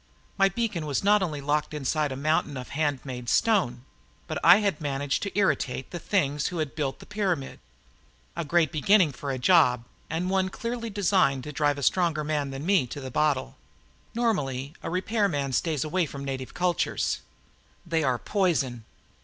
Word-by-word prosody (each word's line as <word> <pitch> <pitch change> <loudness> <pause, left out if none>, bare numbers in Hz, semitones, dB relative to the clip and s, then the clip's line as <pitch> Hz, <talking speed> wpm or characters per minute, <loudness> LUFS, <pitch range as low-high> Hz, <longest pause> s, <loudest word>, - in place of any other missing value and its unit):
My 195 0 +4
beacon 195 -6 -2
was 145 +4 -1
not 205 +1 +4
only 155 -6 -2
locked 150 +2 -1
inside 150 +1 0
a - - -3
mountain 145 0 0
of 125 - -7
handmade 135 -5 -2
stone, 140 - +2 0.4
but - - -3
I 175 +3 +9
had 200 -8 -1
managed 140 -1 -1
to 200 0 -4
irritate 135 -10 0
the 175 - -5
things 150 -7 0
who 180 - -4
had 155 -4 -2
built 140 -4 -2
the - - -13
pyramid. 190 -10 -2 0.8
A 170 - -2
great 165 +1 +2
beginning 175 +1 +4
for 140 +2 -6
a 135 - -1
job 125 -4 +4 0.3
and 165 +3 -2
one 190 0 +1
clearly 230 +3 -4
designed 190 -10 +2
to 150 - -6
drive 145 -1 +1
a 140 - -5
stronger 165 -1 +2
man 150 -2 -1
than 135 +2 -6
me 185 -8 +3
to 145 - -7
the 130 -2 -7
bottle. 140 - 0 0.6
Normally, 145 - -1
a - - -4
repairman 180 - 0
stays 155 0 0
away 165 +2 0
from 140 0 -7
native 130 0 -5
cultures. 175 +1 0 0.7
They 165 -2 0
are 130 -3 +1
poison. 140 - 0
155 Hz, 175 wpm, -27 LUFS, 135-185 Hz, 0.8 s, I